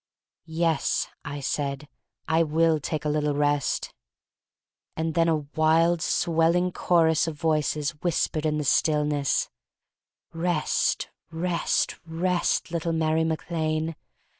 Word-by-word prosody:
"Yes," 165 -1 0
I 145 0 -6
said, 140 +1 -2 0.4
"I 160 +1 +3
will 160 0 +2
take 150 +1 -4
a - - +1
little 150 -1 0
rest." 145 -1 0 1.0
And 160 0 -1
then 165 +1 +3
a 155 -3 0
wild, 165 +2 +3
swelling 170 +3 +2
chorus 165 -3 +2
of 160 - -3
voices 155 -1 0
whispered 155 -1 -1
in 150 0 0
the 150 - -1
stillness: 150 -1 +1 0.8
"Rest, 165 -1 0 0.2
rest, 170 +1 -1
rest, 175 +1 0
little 170 0 -1
Mary 160 0 +1
Mac 160 +1 -3
Lane. 160 0 -1
160 Hz, 115 wpm, -26 LUFS, 150-165 Hz, 1.0 s, I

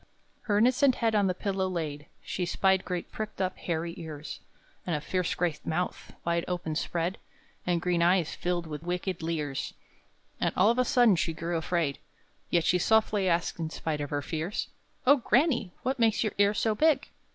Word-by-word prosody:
Her 205 - +4
innocent 255 +4 +4
head 225 -1 +1
on 205 -2 +3
the 185 - 0
pillow 190 -1 -1
laid, 150 -5 -4 0.2
She 180 -1 -2
spied 190 +1 +2
great 180 -2 -4
pricked 215 -2 -5
up, 185 -1 0
hairy 170 0 -2
ears, 155 -3 -7 0.4
And 175 - -1
a - - 0
fierce 180 +3 -1
great 170 -4 -1
mouth, 180 +3 -2
wide 170 0 +1
open 175 -3 -2
spread, 170 +3 -2 0.5
And 175 -1 +2
green 175 -1 +1
eyes, 175 -1 +3
filled 175 -1 -2
with 150 -2 -6
wicked 180 +1 -3
leers; 155 -4 -3 0.6
And - - +1
all 205 +5 +6
of 240 - -1
a 255 - +3
sudden 240 -9 +5
she 160 +2 0
grew 165 +2 -3
afraid; 160 -3 0 0.5
Yet 170 -2 +2
she 180 - +3
softly 210 -1 +3
asked, 170 0 0
in 160 -1 -2
spite 155 -1 -3
of 145 - -3
her 145 -1 -2
fears: 165 +6 -3 0.4
"Oh, 285 +3 +7
granny! 245 - +2
what 260 0 -1
makes 225 -1 +3
your 215 - -1
ears 205 +1 +4
so 220 - +2
big?" 310 +7 +3
180 Hz, 185 wpm, -29 LUFS, 165-210 Hz, 0.6 s, Oh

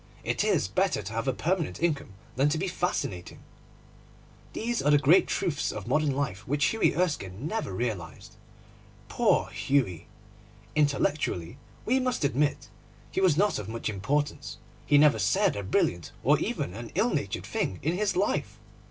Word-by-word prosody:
It - - 0
is - - +2
better - - 0
to 105 +4 -6
have 115 +4 -2
a - - +3
permanent 170 +6 -1
income 150 - -1 0.2
than 135 +3 +3
to 155 - 0
be 190 +4 -1
fascinating. 175 - -3 1.2
These 235 +1 -1
are - - +2
the 145 - +6
great 150 +6 +5
truths 145 -4 -1
of 105 -1 -7
modern 150 +4 +2
life 130 -9 -2
which 145 +2 +1
Hughie 225 -9 +2
Erskine 145 - -2
never 220 - -3
realised. 95 -4 -4 0.7
Poor - - +2
Hughie! 125 - 0 0.7
Intellectually, 140 - 0 0.3
we 255 +4 +2
must 255 -6 -1
admit, 145 +2 0 0.4
he - - -1
was 180 -6 +4
not 205 - +2
of 105 0 -6
much 115 0 -3
importance. 135 +9 -2 0.3
He 145 - +5
never 145 -6 +5
said 105 +2 +2
a 100 - -3
brilliant 90 -3 0
or - - +4
even 90 - -2
an 115 +2 -8
ill - - +2
natured - - -2
thing 95 - -2
in 160 +4 +1
his 205 +1 0
life. 190 +3 0
145 Hz, 160 wpm, -28 LUFS, 105-165 Hz, 1.2 s, the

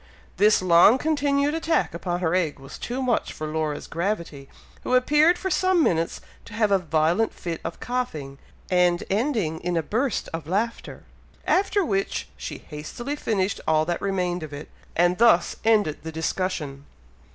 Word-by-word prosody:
This 210 -2 +4
long 180 +6 +6
continued 285 0 +1
attack 325 0 0
upon 175 +1 -3
her 165 -2 +1
egg 175 -5 0
was 135 0 -11
too 255 +2 -3
much 245 -2 0
for 155 - -6
Laura's 155 -1 -2
gravity, 170 -6 -3 0.3
who 255 - 0
appeared 300 +7 +4
for 380 0 -3
some 370 -2 +3
minutes 165 - 0 0.2
to 210 - -10
have 215 -2 +2
a 195 - +4
violent 170 +5 +1
fit 170 -2 -5
of - - -6
coughing, 155 - -4 0.3
and 180 -1 +3
ending 205 - 0
in 175 0 -2
a 165 - 0
burst 250 - -1
of 165 -2 -5
laughter, 215 +7 -3 0.4
after 395 0 +2
which 195 -3 -1
she - - -6
hastily 200 - -5
finished 200 -8 -1
all 155 0 +3
that 175 +1 -2
remained 180 -3 -1
of 155 -2 -7
it, 145 +1 -8 0.3
and 175 +2 +2
thus 225 -8 +4
ended 210 -9 +2
the 160 - -6
discussion. 160 -4 -3
185 Hz, 165 wpm, -24 LUFS, 160-245 Hz, 0.4 s, long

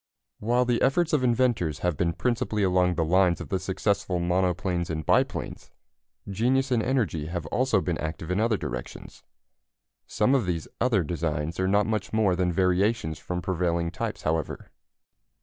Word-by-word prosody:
While 120 +3 +2
the 120 -1 +1
efforts 170 +4 +2
of 145 -4 +2
inventors 115 - +1
have 90 -3 +1
been 85 +2 0
principally 115 -3 -1
along 90 -1 +2
the 80 - 0
lines 90 +1 +3
of - - -7
the 95 - 0
successful 95 -1 -1
monoplanes 90 0 0
and 80 -2 -3
biplanes, - - 0 0.6
genius 125 +7 +1
and 120 -2 +3
energy 110 - -1
have 85 -1 -4
also 115 +3 +1
been 85 -3 -2
active 80 +2 -4
in 90 - +1
other 110 -1 +2
directions. 60 -7 -7 0.9
Some 105 +5 +1
of 125 -9 +2
these 85 -3 -2
other 115 -7 +2
designs 80 0 -3
are 95 - +1
not 100 +1 +3
much 110 -2 -2
more 105 -4 +3
than 90 -1 +1
variations 90 -1 +1
from 90 -1 -4
prevailing 85 -2 0
types, - - -4
however. 80 -1 -2
90 Hz, 165 wpm, -26 LUFS, 85-110 Hz, 0.9 s, lines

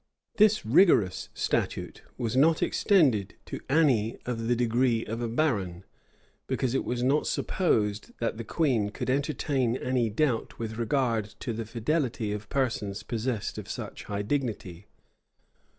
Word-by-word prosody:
This 215 - +4
rigorous 110 - +4
statute - - -2 0.2
was 120 -2 -2
not 155 +4 +4
extended 130 - +2
to - - -6
any 130 -7 +3
of 115 -2 -3
the 120 - +3
degree 120 0 +1
of 115 +2 -4
a 120 - -1
baron; 105 - -1 0.6
because 130 -2 -1
it 135 - +1
was 120 0 -2
not 140 +4 +2
supposed 105 - 0
that 115 -1 -2
the 115 - -4
queen 115 -5 +1
could 120 - -3
entertain 135 -3 0
any 125 -3 0
doubt 120 +1 0
with 110 0 -5
regard 115 -2 +1 0.2
to 120 - -3
the 115 +1 -4
fidelity 115 -1 -1
of 105 0 -6
persons 115 -7 -1
possessed 115 -2 -3
of - - -9
such - - -6
high 100 0 -3
dignity. 105 -7 -3
120 Hz, 145 wpm, -28 LUFS, 110-135 Hz, 0.6 s, This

